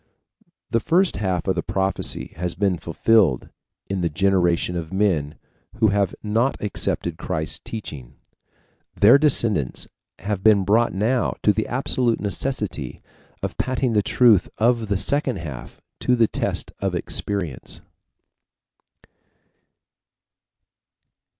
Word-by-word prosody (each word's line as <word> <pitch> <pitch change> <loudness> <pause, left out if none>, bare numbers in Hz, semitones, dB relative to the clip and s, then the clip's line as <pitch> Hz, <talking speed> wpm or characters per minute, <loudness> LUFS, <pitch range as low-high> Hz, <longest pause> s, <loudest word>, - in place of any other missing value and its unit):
The 115 - +3
first 175 - +2
half 95 -4 -1
of - - +3
the - - -2
prophecy 95 0 -1
has 90 0 -3
been 95 -4 0
fulfilled 85 - +2 0.4
in 95 -1 -2
the 85 - +1
generation 90 0 +1
of 85 -1 -5
men 85 -7 0 0.4
who 110 -2 +3
have 100 -2 0
not 115 +5 0
accepted 105 - -2
Christ's 80 0 -3
teaching, 70 - -8 0.8
Their 110 +7 +6
descendants 115 - +1 0.3
have 100 +1 -3
been 105 -3 +5
brought 115 +4 +3
now 115 +7 0
to 105 - +4
the 110 - -2
absolute 125 -2 0
necessity 105 - -3 0.4
of - - -4
patting 130 -1 0
the 105 - +3
truth 115 -2 +4
of 115 0 +2
the 100 -1 0
second 140 +4 0
half 75 -7 -8 0.2
to 125 - +2
the 115 -2 +4
test - - -1
of - - -1
experience. 90 -11 -2
100 Hz, 120 wpm, -22 LUFS, 90-115 Hz, 0.8 s, Their